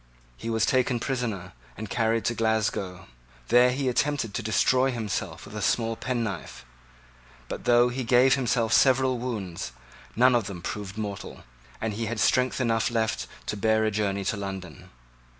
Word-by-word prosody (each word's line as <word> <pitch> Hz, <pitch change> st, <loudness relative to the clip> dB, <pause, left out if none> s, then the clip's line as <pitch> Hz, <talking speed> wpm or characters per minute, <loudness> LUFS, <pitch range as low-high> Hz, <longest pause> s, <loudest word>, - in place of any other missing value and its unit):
He 115 Hz, -, -6 dB
was 115 Hz, -1 st, +2 dB
taken 130 Hz, -2 st, +2 dB
prisoner, 115 Hz, -8 st, -3 dB, 0.2 s
and 110 Hz, -, -5 dB
carried 115 Hz, +1 st, 0 dB
to 120 Hz, -, +1 dB
Glasgow. 105 Hz, -5 st, -1 dB, 0.4 s
There 125 Hz, +1 st, +6 dB
he 135 Hz, +1 st, -2 dB
attempted 130 Hz, -3 st, 0 dB
to -, -, -2 dB
destroy 125 Hz, +5 st, +2 dB
himself 115 Hz, -6 st, -4 dB
with 100 Hz, -, -11 dB
a 105 Hz, -, -4 dB
small 115 Hz, +2 st, +1 dB
penknife: 105 Hz, -, -4 dB, 0.8 s
but -, -, -6 dB
though 120 Hz, 0 st, +5 dB
he 130 Hz, +1 st, -3 dB
gave 125 Hz, +2 st, +5 dB
himself 120 Hz, -4 st, +1 dB
several 130 Hz, -1 st, +4 dB
wounds, 100 Hz, -, -4 dB, 0.4 s
none 125 Hz, +2 st, +5 dB
of 120 Hz, -4 st, +2 dB
them 90 Hz, -4 st, -7 dB
proved 100 Hz, +1 st, -5 dB
mortal, 105 Hz, -2 st, -6 dB, 0.4 s
and 110 Hz, -1 st, -2 dB
he 110 Hz, +2 st, -3 dB
had 115 Hz, 0 st, -3 dB
strength 130 Hz, +3 st, +2 dB
enough 115 Hz, -3 st, +1 dB
left 115 Hz, -2 st, -1 dB, 0.2 s
to -, -, -3 dB
bear 110 Hz, +1 st, +2 dB
a 110 Hz, -, +1 dB
journey 100 Hz, -1 st, -1 dB
to 105 Hz, -, 0 dB
London. 95 Hz, -4 st, -7 dB
115 Hz, 165 wpm, -26 LUFS, 100-125 Hz, 0.8 s, There